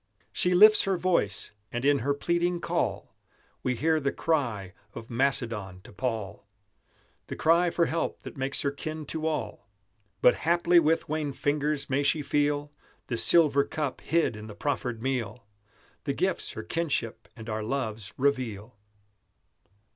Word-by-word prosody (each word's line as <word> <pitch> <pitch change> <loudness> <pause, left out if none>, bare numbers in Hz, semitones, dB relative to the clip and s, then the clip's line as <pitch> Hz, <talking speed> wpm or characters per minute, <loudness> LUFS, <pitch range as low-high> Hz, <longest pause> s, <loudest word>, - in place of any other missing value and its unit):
She 180 0 +2
lifts 215 +4 +7
her 195 -1 +1
voice, 170 - 0 0.2
and 120 +2 -3
in 145 0 +4
her 140 +5 0
pleading 170 +3 0
call - - -2 0.5
We 125 - 0
hear 160 +5 +2
the 140 -2 0
cry 115 - -1 0.2
of 115 +1 -9
Macedon 115 -7 0
to - - -14
Paul, 110 -3 -4 0.8
The - - -5
cry 170 +2 +3
for 170 0 +2
help 165 +1 -2
that - - -9
makes 135 0 +1
her 140 - 0
kin 155 +2 -6
to 160 +2 -3
all. 120 -9 -4 0.5
But 125 - +5
haply 170 +1 +4
with 160 0 +1
wan 150 -2 -2
fingers 145 +1 -1
may 135 +1 +1
she 150 +1 +1
feel 145 0 0 0.4
The 120 - -1
silver 140 +3 +5
cup 145 -2 -4
hid 160 -7 +1
in 105 0 -9
the 105 - -9
proffered 125 -5 -2
meal, 125 -4 -3 0.6
The - - 0
gifts - - -1
her - - -6
kinship 135 - -2
and 110 -2 -10
our 110 -1 -2
loves 110 -4 -3
reveal. 125 -5 -1
140 Hz, 155 wpm, -28 LUFS, 115-160 Hz, 0.8 s, lifts